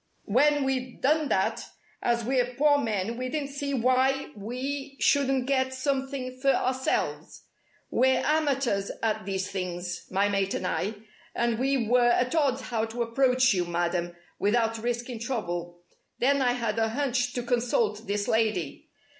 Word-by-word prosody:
When 290 Hz, +6 st, +3 dB
we'd 255 Hz, -2 st, -2 dB
done 300 Hz, +2 st, +2 dB
that, -, -, +1 dB, 0.4 s
as 235 Hz, -1 st, +1 dB
we're 250 Hz, -1 st, 0 dB
poor 290 Hz, 0 st, +4 dB
men 225 Hz, -2 st, -2 dB
we 255 Hz, 0 st, -3 dB
didn't 285 Hz, 0 st, -3 dB
see 280 Hz, 0 st, -3 dB
why 260 Hz, +2 st, +2 dB
we 270 Hz, +6 st, -5 dB
shouldn't 270 Hz, -2 st, +2 dB
get 260 Hz, -1 st, 0 dB
something 265 Hz, -1 st, -2 dB
for 275 Hz, -, +3 dB
ourselves. 260 Hz, 0 st, -1 dB, 0.5 s
We're 260 Hz, +1 st, +3 dB
amateurs 275 Hz, -10 st, +1 dB
at 215 Hz, -3 st, -1 dB
these 195 Hz, 0 st, -2 dB
things, 175 Hz, -2 st, -4 dB
my 195 Hz, +2 st, +2 dB
mate 195 Hz, -1 st, 0 dB
and 185 Hz, -, -3 dB
I, 205 Hz, +4 st, -1 dB, 0.4 s
and 235 Hz, -1 st, 0 dB
we 265 Hz, -2 st, +1 dB
were 240 Hz, +2 st, +4 dB
at 245 Hz, +1 st, +2 dB
odds 275 Hz, -5 st, +2 dB
how 225 Hz, -3 st, -1 dB
to 230 Hz, +2 st, -3 dB
approach 255 Hz, +1 st, +3 dB
you, 180 Hz, -2 st, 0 dB
Madam, 175 Hz, 0 st, -1 dB, 0.2 s
without 225 Hz, +2 st, +1 dB
risking 240 Hz, +1 st, -3 dB
trouble. 175 Hz, -8 st, -4 dB, 0.3 s
Then 280 Hz, +2 st, +2 dB
I 245 Hz, -2 st, +3 dB
had 230 Hz, -3 st, -1 dB
a 225 Hz, 0 st, +2 dB
'hunch' 245 Hz, -1 st, 0 dB
to 245 Hz, -, -3 dB
consult 235 Hz, -3 st, 0 dB
this 205 Hz, 0 st, -1 dB
lady. 220 Hz, -, -1 dB
245 Hz, 155 wpm, -27 LUFS, 215-270 Hz, 0.5 s, poor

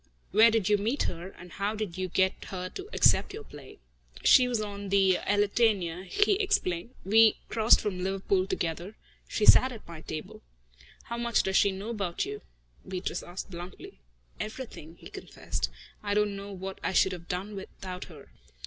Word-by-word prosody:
Where 220 Hz, +4 st, +7 dB
did 220 Hz, -4 st, +1 dB
you 210 Hz, -1 st, +3 dB
meet 230 Hz, +8 st, 0 dB
her, 170 Hz, +1 st, -4 dB
and 180 Hz, -2 st, -13 dB
how 200 Hz, +2 st, -2 dB
did 210 Hz, -5 st, -4 dB
you 185 Hz, 0 st, -2 dB
get 190 Hz, +1 st, 0 dB
her 185 Hz, -1 st, -5 dB
to 385 Hz, -, -8 dB
accept -, -, +3 dB
your 435 Hz, -, -7 dB
play?" 145 Hz, -, -13 dB, 0.5 s
"She 250 Hz, -1 st, +7 dB
was 240 Hz, -3 st, 0 dB
on 200 Hz, -1 st, -5 dB
the 195 Hz, -1 st, +4 dB
Elletania," 200 Hz, -4 st, +2 dB
he 410 Hz, -, +2 dB
explained. 235 Hz, -, 0 dB
"We 220 Hz, +2 st, +6 dB
crossed 220 Hz, 0 st, +5 dB
from 200 Hz, -4 st, -3 dB
Liverpool 190 Hz, 0 st, 0 dB
together. 175 Hz, +4 st, -3 dB, 0.3 s
She 215 Hz, -, 0 dB
sat 260 Hz, +4 st, +7 dB
at 230 Hz, -3 st, -10 dB
my 170 Hz, -2 st, -9 dB
table." 155 Hz, -1 st, -7 dB, 0.6 s
"How 235 Hz, -, -5 dB
much 235 Hz, -1 st, +2 dB
does 190 Hz, -, -1 dB
she 200 Hz, -, +4 dB
know 195 Hz, +4 st, -6 dB
about 195 Hz, -6 st, -2 dB
you?" 140 Hz, -, -6 dB, 0.5 s
Beatrice 185 Hz, 0 st, -3 dB
asked 180 Hz, +2 st, -8 dB
bluntly. 175 Hz, -, -9 dB, 0.4 s
"Everything," 215 Hz, -, -7 dB
he -, -, -11 dB
confessed. -, -, -4 dB, 0.3 s
"I 205 Hz, -1 st, -1 dB
don't 210 Hz, -1 st, +1 dB
know 200 Hz, +1 st, -7 dB
what 190 Hz, 0 st, -6 dB
I -, -, -1 dB
should 190 Hz, -, +4 dB
have 175 Hz, -2 st, -8 dB
done 195 Hz, +4 st, -4 dB
without 185 Hz, -1 st, -7 dB
her. 150 Hz, -5 st, -14 dB
195 Hz, 175 wpm, -29 LUFS, 180-215 Hz, 0.6 s, Where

